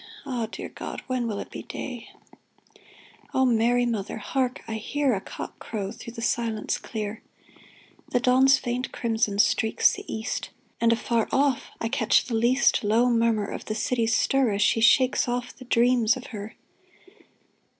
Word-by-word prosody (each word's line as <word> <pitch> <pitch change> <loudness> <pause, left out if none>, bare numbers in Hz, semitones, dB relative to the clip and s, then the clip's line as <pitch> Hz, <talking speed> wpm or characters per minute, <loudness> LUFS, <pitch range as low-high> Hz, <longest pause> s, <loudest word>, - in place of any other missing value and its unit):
Ah, 245 -5 -2
dear - - -6
God! - - -7
when 255 -2 -1
will 210 -3 -3
it - - -7
be - - -6
day? 245 -4 -7 1.3
O 265 - +4
Mary, 245 0 +3
Mother! 220 -4 -3
Hark! 255 +4 -2
I 225 - -4
hear 275 +4 0
A 195 - -2
cock - - -8
crow 200 -3 -4
through 230 0 -10
the 230 -1 -6
silence 230 -3 -1
clear! 215 -1 -5 0.9
The 245 - +1
dawn's 260 +2 +5
faint 245 0 -3
crimson 220 -3 -1
streaks 220 +1 +3
the - - -8
east, 220 +2 -3 0.3
And, 230 0 +4
afar 230 -1 +1
off, 275 -1 +1
I 230 - -1
catch 225 -2 +2
the 245 - -5
least 240 +4 +3
Low 230 +4 +3
murmur 230 -3 +2
of - - -6
the 215 - -3
city's 230 0 +1
stir 270 -3 +2
As 200 +1 +2
she 225 - +2
shakes 255 +3 +4
off 245 0 -3
the 255 - -12
dreams 240 0 +3
of 255 - -9
her 210 +1 -7
235 Hz, 165 wpm, -26 LUFS, 220-250 Hz, 1.3 s, dawn's